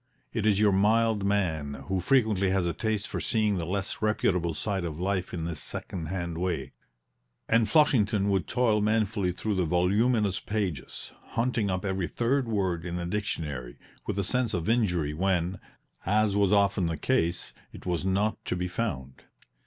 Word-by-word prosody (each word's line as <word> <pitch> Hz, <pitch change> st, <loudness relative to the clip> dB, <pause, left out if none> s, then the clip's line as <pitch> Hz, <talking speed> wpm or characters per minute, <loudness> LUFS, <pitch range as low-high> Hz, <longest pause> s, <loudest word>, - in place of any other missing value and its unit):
It 110 Hz, -2 st, 0 dB
is 105 Hz, -2 st, +3 dB
your 105 Hz, -1 st, +5 dB
mild 105 Hz, +2 st, +3 dB
man, 80 Hz, -8 st, 0 dB
who 95 Hz, 0 st, 0 dB
frequently 105 Hz, -3 st, +2 dB
has 95 Hz, -1 st, +1 dB
a 85 Hz, -, 0 dB
taste 110 Hz, -2 st, -2 dB
for -, -, -4 dB
seeing 105 Hz, -4 st, +1 dB
the 85 Hz, -, -3 dB
less 95 Hz, +2 st, -2 dB
reputable 90 Hz, -6 st, +1 dB
side 95 Hz, +2 st, -2 dB
of 80 Hz, -2 st, -4 dB
life 95 Hz, 0 st, -1 dB
in 80 Hz, -2 st, -4 dB
this 85 Hz, -3 st, -3 dB
second 85 Hz, -4 st, -5 dB
hand 85 Hz, -1 st, -3 dB
way, 80 Hz, -7 st, -2 dB, 0.8 s
and 115 Hz, -1 st, +3 dB
Flushington 110 Hz, -10 st, +3 dB
would 95 Hz, -5 st, 0 dB
toil 115 Hz, -4 st, +2 dB
manfully 105 Hz, -3 st, +1 dB
through 105 Hz, +4 st, -2 dB
the 95 Hz, -2 st, +1 dB
voluminous 100 Hz, +4 st, +2 dB
pages, 95 Hz, -11 st, -4 dB, 0.2 s
hunting 115 Hz, -3 st, 0 dB
up 95 Hz, +1 st, -2 dB
every 95 Hz, -2 st, -1 dB
third 125 Hz, +2 st, 0 dB
word 95 Hz, -6 st, -1 dB
in 85 Hz, 0 st, -4 dB
the 90 Hz, 0 st, -3 dB
dictionary; 75 Hz, -, -3 dB, 0.3 s
with -, -, -2 dB
a 100 Hz, -, +1 dB
sense 120 Hz, +1 st, 0 dB
of 85 Hz, -2 st, -2 dB
injury 90 Hz, -10 st, +1 dB
when, 90 Hz, +1 st, 0 dB, 0.4 s
as 105 Hz, +1 st, +2 dB
was 100 Hz, -2 st, +3 dB
often 100 Hz, -3 st, +3 dB
the 80 Hz, -1 st, -2 dB
case, 85 Hz, +4 st, 0 dB, 0.2 s
it -, -, -12 dB
was 90 Hz, -1 st, -1 dB
not 100 Hz, +3 st, 0 dB
to -, -, -1 dB
be 90 Hz, 0 st, -2 dB
found. 80 Hz, -, -4 dB
95 Hz, 175 wpm, -28 LUFS, 85-110 Hz, 0.8 s, your